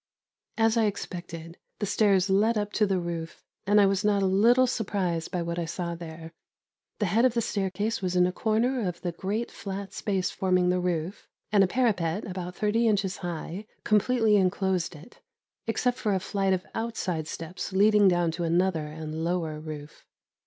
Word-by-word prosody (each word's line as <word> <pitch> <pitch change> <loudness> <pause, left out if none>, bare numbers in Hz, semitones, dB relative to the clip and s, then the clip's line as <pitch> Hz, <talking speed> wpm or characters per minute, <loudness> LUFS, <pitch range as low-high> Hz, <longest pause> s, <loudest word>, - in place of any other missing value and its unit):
As 225 0 +3
I 225 - +4
expected, 175 -4 -5 0.2
the 205 - -2
stairs 200 -2 +3
led 210 +4 +3
up 210 0 -2
to 210 - +2
the 195 -1 +1
roof, 170 -1 -5 0.2
and 205 +1 +5
I 200 - +6
was 195 +1 +1
not 205 -1 +2
a - - +3
little 230 +7 +5
surprised 195 -9 -1
by 175 -2 -2
what 170 +1 -3
I 170 - -1
saw 170 +1 -3
there. 165 -1 -9 0.6
The 210 - 0
head 210 +6 +2
of 255 -2 +3
the - - +3
staircase 205 +2 -1
was 180 -1 -1
in 180 0 +5
a 180 - +1
corner 230 +6 +1
of 175 -1 -5
the 175 - -2
great 205 +7 -3
flat 195 0 -6
space 190 -3 -1
forming 185 -1 +2
the 180 0 +2
roof, 175 0 -2 0.2
and 205 -2 +5
a - - +3
parapet, 200 -6 0
about 180 -1 -5
thirty 225 +2 +1
inches 195 -3 +1
high, 175 +3 -5 0.2
completely 215 0 +3
enclosed 185 -2 0
it, 155 +10 -15 0.5
except 245 +2 0
for 210 -2 +1
a - - +1
flight 195 0 0
of 185 -1 -2
outside 190 -9 -2
steps 165 +5 -6
leading 205 +1 +5
down 175 -2 +3
to 170 +2 -4
another 170 -2 +1
and 155 +1 -5
lower 165 -3 -1
roof. 150 -1 -9
190 Hz, 185 wpm, -27 LUFS, 175-210 Hz, 0.6 s, I